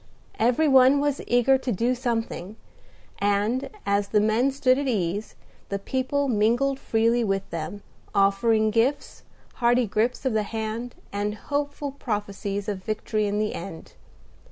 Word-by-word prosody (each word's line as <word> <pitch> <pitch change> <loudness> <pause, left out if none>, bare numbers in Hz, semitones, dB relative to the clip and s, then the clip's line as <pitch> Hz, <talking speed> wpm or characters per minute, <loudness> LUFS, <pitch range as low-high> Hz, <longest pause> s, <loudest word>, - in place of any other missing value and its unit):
Every 245 +7 +3
one 265 0 +6
was 290 -1 0
eager 245 +2 +4
to 255 - -2
do 235 +5 +1
something; 225 -6 -3 0.6
and, 205 +5 +1 0.2
as 200 0 +1
the 210 - +2
men 220 +5 +2
stood 265 -1 +2
at 285 - -2
ease, 205 -3 -2 0.3
the 200 - -1
people 260 +7 -1
mingled 245 +4 +2
freely 230 +1 +2
with 195 -2 -1
them, 165 +5 -5 0.3
offering 215 +2 +3
gifts, 240 +6 0 0.4
hearty 245 0 +3
grips 225 +5 -1
of 260 - +1
the 215 - +2
hand, 220 +3 -4 0.2
and 205 +1 -2
hopeful 285 +3 -3
prophecies 205 -5 -4
of 195 -3 -4
victory 215 0 -1
in 205 0 -1
the 210 0 0
end. 170 -2 -8
225 Hz, 145 wpm, -25 LUFS, 205-255 Hz, 0.6 s, one